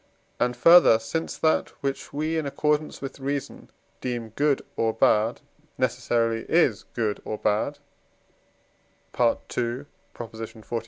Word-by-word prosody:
and 125 0 0
further, 170 -4 +7
since 115 +9 -4
that 160 - +2
which 135 0 -3
we, 155 +3 -1
in 160 -3 -1
accordance 150 +1 -1
with 135 +1 -6
reason, 140 +1 -4 0.3
deem 120 -3 -3
good 140 +5 +1
or 115 0 +1
bad, 110 +1 +2 0.4
necessarily 120 -3 0
is 140 - +3
good 110 -3 -1
or 110 - -4
bad 105 0 0 1.4
(II. 120 +2 0 0.3
xli.) 115 -1 -8
125 Hz, 115 wpm, -25 LUFS, 115-145 Hz, 1.4 s, further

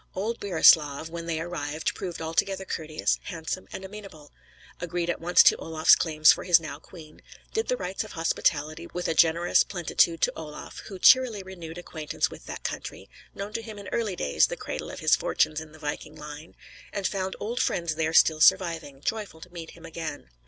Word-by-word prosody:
Old 220 +5 -2
Burislav, 160 -5 +4
when 170 0 -6
they 160 -2 -1
arrived, 160 -2 -3
proved 175 -4 -6
altogether 190 +4 -1
courteous, 155 -3 -1
handsome, 170 0 -5
and 190 - -7
amenable; 190 -7 -11 0.5
agreed 175 0 -2
at - - -6
once 175 +2 +6
to - - +6
Olaf's 160 -1 +4
claims 155 -2 +5
for - - -2
his 175 -2 +6
now 155 -3 -7
queen, 155 -2 -14 0.3
did 445 0 -1
the 250 - 0
rites 185 +1 -3
of 215 - -11
hospitality 160 -1 0
with 180 0 -4
a - - +1
generous 170 +2 +4
plenitude 170 -2 +1
to - - +2
Olaf; 150 -2 -8
who 195 - -7
cheerily 235 -2 +5
renewed 175 -3 -9
acquaintance 160 -3 -3
with - - -12
that - - -7
country, - - -6 0.2
known 200 +2 -6
to 230 - -2
him 220 -2 -9
in 200 -2 -8
early 220 -5 -1
days 70 - +2
(the - - -5
cradle - - -5
of - - -8
his - - +5
fortunes 155 0 0
in 160 -1 -11
the 155 - -15
viking 150 0 -5
line), 150 +1 -10 0.4
and 200 -2 -4
found 190 -1 -2
old 235 +4 -3
friends 170 -2 0
there 160 0 -1
still 160 -1 +5
surviving, 165 -7 +3
joyful 210 -3 -3
to 175 +2 -13
meet 165 -2 -7
him 165 - -13
again. 155 - -7
170 Hz, 195 wpm, -27 LUFS, 155-190 Hz, 0.5 s, once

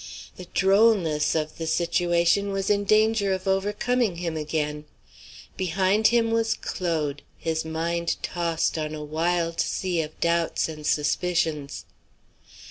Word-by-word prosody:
The 180 - -9
drollness 190 -7 +3
of 155 0 -2
the 165 - -3
situation 175 +3 +1
was 195 +1 -1
in 205 0 +1
danger 215 -1 +3
of 190 +1 -4
overcoming 210 +3 0
him 170 -1 -3
again. 150 -1 -3 0.7
Behind 190 +4 +2
him 230 -1 +2
was 225 0 +1
Claude, 155 -5 -2 0.2
his 160 -1 -2
mind 170 +1 -2
tossed 165 -2 -1
on 155 0 -3
a 150 - -6
wild 165 +2 -1
sea 180 -3 0
of 155 0 -8
doubts 170 -1 +1
and 155 -2 -6
suspicions. 155 -2 0
170 Hz, 130 wpm, -25 LUFS, 160-195 Hz, 0.7 s, drollness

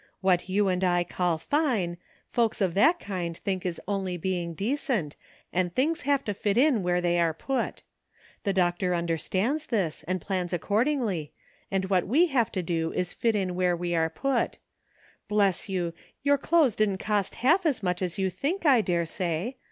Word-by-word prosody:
What 185 -1 +2
you 200 +2 +2
and 185 0 0
I 175 -1 +3
call 175 -2 -1
fine, 220 - 0 0.3
folks 230 -2 0
of 190 -4 +1
that 315 - +4
kind 175 -4 -4
think 185 -2 -2
is 170 - -3
only 190 -3 -2
being 175 -1 -2
decent, 215 - -1 0.4
and 175 -1 0
thing 305 +6 +2
i - - -13
have 280 -1 +2
to 205 - -1
fit 200 +1 -1
in 260 -4 +4
where 180 0 +1
they 175 0 +1
are 165 -2 +2
put. 270 +10 -3 0.6
The 200 - +1
Doctor 180 -1 +1
un 170 0 -1
derstands 195 - -1
this, 190 -10 -1
and 185 +1 0
plans 180 0 -3
accordingly, 205 - 0 0.4
and 190 -1 0
what 185 -2 +2
we 295 - +4
have 265 -9 +1
to 185 - -1
do 165 -1 -1
is 180 -1 -1
to - - -13
fit 205 -5 +1
where 180 -1 +1
we 175 0 -2
are 160 -1 +2
put. 260 +8 -1 0.7
Bless 200 -2 +1
you! 175 -3 -1 0.3
your 285 0 +3
clothes 300 -7 +3
didn't 205 -3 +1
cost 205 -1 -1
half 320 +10 +3
as 275 - 0
much 180 0 -1
as 180 -2 -2
you 190 -1 0
think, 310 - -2
I 265 -6 +6
daresay. 175 +3 -1
190 Hz, 185 wpm, -27 LUFS, 175-235 Hz, 0.7 s, I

